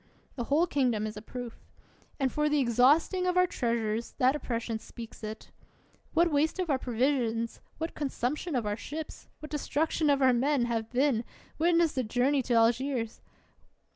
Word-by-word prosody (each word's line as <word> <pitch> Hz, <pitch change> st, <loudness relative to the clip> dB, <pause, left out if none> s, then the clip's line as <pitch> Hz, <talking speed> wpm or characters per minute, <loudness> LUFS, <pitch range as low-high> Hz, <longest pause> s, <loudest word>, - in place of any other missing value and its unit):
The 240 Hz, -, -4 dB
whole 300 Hz, +7 st, +3 dB
kingdom 250 Hz, -9 st, +1 dB
is 215 Hz, -1 st, -5 dB
a 210 Hz, -, -7 dB
proof. 245 Hz, +1 st, -8 dB, 0.6 s
And 265 Hz, -2 st, +1 dB
for 300 Hz, 0 st, +1 dB
the 300 Hz, -, +2 dB
exhausting 280 Hz, -, +3 dB
of 360 Hz, 0 st, +1 dB
our 365 Hz, -, +6 dB
treasures, 230 Hz, -6 st, -2 dB
that 260 Hz, +2 st, +3 dB
oppression 230 Hz, -5 st, -3 dB
speaks 230 Hz, 0 st, -11 dB
it. 215 Hz, 0 st, -7 dB, 0.6 s
What 340 Hz, +1 st, +4 dB
waste 300 Hz, +4 st, +1 dB
of 360 Hz, -4 st, -1 dB
our 265 Hz, -, +1 dB
provisions, 235 Hz, -2 st, 0 dB, 0.2 s
what 325 Hz, +2 st, -4 dB
consumption 290 Hz, +3 st, -2 dB
of 240 Hz, -4 st, 0 dB
our 205 Hz, 0 st, -1 dB
ships, 305 Hz, +7 st, -7 dB
what 305 Hz, -1 st, -8 dB
destruction 305 Hz, +1 st, 0 dB
of 280 Hz, -1 st, +4 dB
our 260 Hz, -2 st, +5 dB
men, 260 Hz, +1 st, +2 dB
have 225 Hz, -2 st, -2 dB
been, 250 Hz, -2 st, +2 dB, 0.2 s
— -, -, -27 dB
witness 335 Hz, -1 st, +3 dB
the 260 Hz, -, -1 dB
journey 255 Hz, +5 st, +1 dB
to 245 Hz, -1 st, 0 dB
Algiers 230 Hz, +1 st, +1 dB
260 Hz, 170 wpm, -29 LUFS, 230-300 Hz, 0.6 s, our